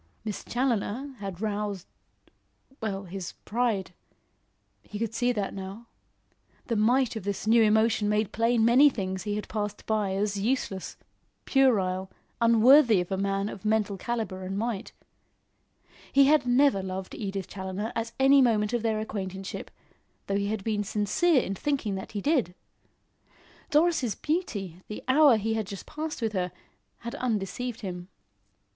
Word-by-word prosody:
Miss 210 -2 -4
Challoner 250 +2 -1
had 195 -2 -6
roused 205 -3 -2 1.0
well, 200 -3 -3
his 190 0 -6
pride. 220 -5 -1 0.9
He 210 - -8
could 225 0 -2
see 245 +2 +1
that 205 -5 -2
now. 195 +4 -7 0.8
The 230 - -1
might 240 +4 +2
of 220 - -5
this 200 +1 -3
new 230 +1 +5
emotion 220 0 +3
made 210 -1 +1
plain 230 +1 +2
many 255 +5 +7
things 190 -6 -4
he 205 -1 -1
had 210 - -4
passed 210 -1 -4
by 210 -3 0
as 200 0 -1
useless, 205 -4 -2 0.5
puerile, 190 -9 +2 0.3
unworthy 230 0 +6
of 180 +1 -4
a - - +1
man 195 +1 0
of 200 -2 -8
mental 215 -2 +1
calibre 220 -2 -3
and 190 +1 -4
might. 225 -1 -3 1.2
He 275 0 +6
had 295 -2 +4
never 250 -4 +4
loved 190 0 -5
Edith 195 -3 -4
Challoner 190 +3 -4
at 230 0 -2
any 270 +1 +6
moment 220 -3 +2
of 240 - +1
their 220 -1 0
acquaintanceship, 195 -3 -5 0.6
though 200 - -1
he 200 0 -1
had 210 -1 -2
been 210 -1 0
sincere 220 - +2
in 195 - -3
thinking 265 -2 -1
that 190 +2 -6
he 205 - -3
did. 255 - +1 1.1
Doris' 300 -7 +2
beauty, 205 - -3
the 210 - -7
hour 270 -2 +6
he 220 +1 -1
had 220 -3 -2
just 200 -2 -7
passed 305 -4 -5
with 220 -1 0
her, 180 -2 -1 0.5
had 235 +1 -6
undeceived 245 -1 -3
him. 180 -3 -6
215 Hz, 150 wpm, -27 LUFS, 195-240 Hz, 1.2 s, many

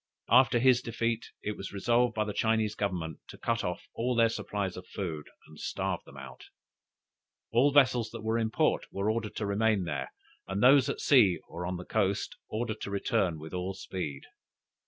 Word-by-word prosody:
After 125 0 +6
his 125 0 +4
defeat, 115 -1 -2
it 105 0 -2
was 95 - -7
resolved 120 +4 +2
by 110 - +1
the 105 - -4
Chinese 110 -1 +1
Government 90 -7 -3
to - - -11
cut 115 -2 -1
off 90 -1 -4
all 125 +2 -1
their 115 -1 +5
supplies 100 -4 -3
of 90 - -9
food, 80 -7 -5 0.2
and 75 -1 -15
starve - - -2
them - - -13
out. - - -10 1.1
All 125 +5 +4
vessels 125 -5 +4
that 115 -1 -8
were 110 +1 +1
in 110 -1 0
port - - +1
were 100 +2 0
ordered 110 -2 -3
to 105 - -2
remain 105 0 +2
there, 75 -5 -4 0.4
and 95 +3 -1
those 130 0 +6
at - - -3
sea, 110 -11 +5
or 90 0 -5
on 90 0 -3
the 90 - -8
coast 100 -3 0
ordered 110 0 -3
to - - -4
return 95 -4 0
with 80 +2 -10
all 90 +1 -3
speed. 90 -7 -5
105 Hz, 190 wpm, -30 LUFS, 95-115 Hz, 1.1 s, After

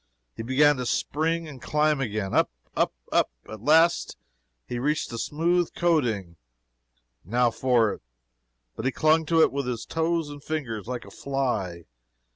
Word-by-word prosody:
He - - -6
began 140 +4 +4
to 125 - -3
spring 165 +5 -1
and 135 -5 -10
climb 150 0 +1
again. 105 -5 -2
Up, - - +3 0.3
up, - - +2 0.2
up - - +3 0.2
at 110 -1 -9
last 160 +6 +3 0.5
he 120 - -4
reached 150 +3 -1
the 115 - -4
smooth 170 +5 +1
coating 115 - 0 0.9
now 120 +5 +2
for 120 -4 +2
it. - - -11 0.7
But - - -5
he 130 - +2
clung 155 +1 +3
to 165 0 +5
it - - +3
with 140 -2 -3 0.2
toes 165 -1 0
and 145 -1 -10
fingers, 115 -11 -4
like 125 -1 -4
a - - -13
fly. 110 -11 -2
140 Hz, 155 wpm, -26 LUFS, 115-155 Hz, 0.9 s, to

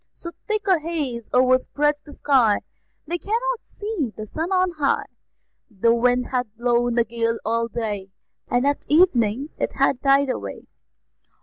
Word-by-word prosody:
So 340 - -8 0.2
thick 430 -2 -1
a 370 -4 +4
haze 290 -8 -4
o'erspreads 260 +4 +2
the 295 - -14
sky 255 -8 +3 0.4
They 345 +3 -3
cannot 475 +5 -1
see 410 - -4
the 215 - -5
sun 320 - -4
on 370 -1 +2
high; 280 - +1 0.6
The 230 +2 +2
wind 245 +1 +2
hath 250 -2 -1
blown 240 0 +1
a 235 - +5
gale 230 0 -1
all 230 +1 0
day, 210 -4 -4 0.4
At 275 +4 +1
evening 275 - +3
it - - -1
hath 255 - +1
died 275 0 +4
away. 100 -1 -6
255 Hz, 145 wpm, -23 LUFS, 230-315 Hz, 0.6 s, a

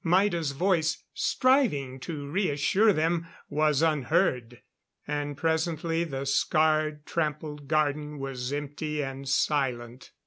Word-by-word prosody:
Maida's 170 -4 +2
voice, 165 0 +1
striving 220 - +1
to 145 0 -6
reassure 185 +5 +2
them, 165 0 0 0.2
was 150 0 +2
unheard. 125 -5 +1 0.4
And 145 -1 -3
presently 165 +1 0
the 135 -3 -4
scarred, 155 +2 +1
trampled 150 -2 -3
garden 150 0 0
was 135 -2 -4
empty 150 +1 -3
and 135 0 -6
silent. 125 -4 -1
150 Hz, 105 wpm, -28 LUFS, 140-165 Hz, 0.4 s, Maida's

